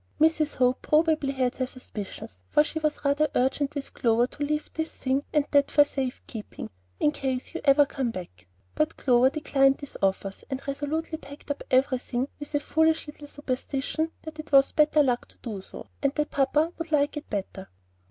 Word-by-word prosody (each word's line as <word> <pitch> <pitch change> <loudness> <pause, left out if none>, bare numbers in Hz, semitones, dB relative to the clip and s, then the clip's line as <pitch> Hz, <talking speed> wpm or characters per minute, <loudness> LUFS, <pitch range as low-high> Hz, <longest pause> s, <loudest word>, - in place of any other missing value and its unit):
Mrs. 315 -1 +3
Hope 250 0 +2
probably 310 -2 +2
had 255 -2 0
her 255 - -1
suspicions, 205 - -8
for 300 - +5
she 315 +1 -4
was 305 -1 -2
rather 290 +2 +3
urgent 275 +3 +1
with 280 -1 -5
Clover 235 0 +3
to 290 +3 -6
leave 300 +1 -1
this 320 0 -2
thing 265 +1 -1
and 295 -2 +2
that 285 -1 +4
for 290 - +6
safe 265 -3 -3
keeping 215 - -8 0.3
"in 295 - +3
case 265 -2 -3
you 340 - -4
ever 285 +1 +6
come 270 -3 -2
back;" 95 - -8 0.3
but 305 +1 0
Clover 250 0 +4
declined 275 -2 +3
these 285 - -8
offers, 195 0 -1
and 265 +1 -5
resolutely 310 +3 -2
packed 285 0 -9
up 285 - -4
everything 255 -1 +1
with 290 0 -6
a - - +3
foolish 320 +2 +2
little 295 -1 -10
superstition 285 +3 -3
that 315 -1 -9
it 310 0 -8
was 275 -1 +6
"better 300 0 +4
luck" 250 -3 0
to - - -23
do 210 -5 -5
so, - - -10 0.2
and 280 0 +1
that 300 0 -1
papa 300 +4 +2
would 330 -1 -5
like 290 0 +2
it 295 - -7
better. 195 -1 -4
280 Hz, 190 wpm, -27 LUFS, 255-300 Hz, 0.3 s, for